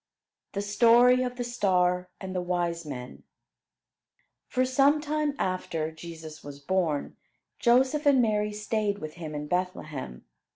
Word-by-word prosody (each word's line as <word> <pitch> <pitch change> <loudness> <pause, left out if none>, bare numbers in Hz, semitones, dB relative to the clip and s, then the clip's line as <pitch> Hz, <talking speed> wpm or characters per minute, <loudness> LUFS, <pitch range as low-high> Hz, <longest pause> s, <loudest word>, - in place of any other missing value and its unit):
THE 200 - -2
STORY 240 +4 +5
OF 250 -1 -2
THE 245 - -3
STAR 180 -6 +1
AND 190 -1 -6
THE 180 - 0
WISE 175 -2 -2
MEN 125 -3 -7 1.3
For 255 0 +1
some 275 +3 +4
time 300 -1 -1
after 165 -4 -2
Jesus 160 -1 -10
was 145 -1 -9
born, 160 -1 -1 0.4
Joseph 260 +5 +3
and 275 -2 +6
Mary 210 -3 +1
stayed 210 -1 -1
with 155 -5 -7
him 160 -3 -7
in 150 0 -4
Bethlehem. 155 - -4
190 Hz, 135 wpm, -27 LUFS, 165-245 Hz, 1.3 s, and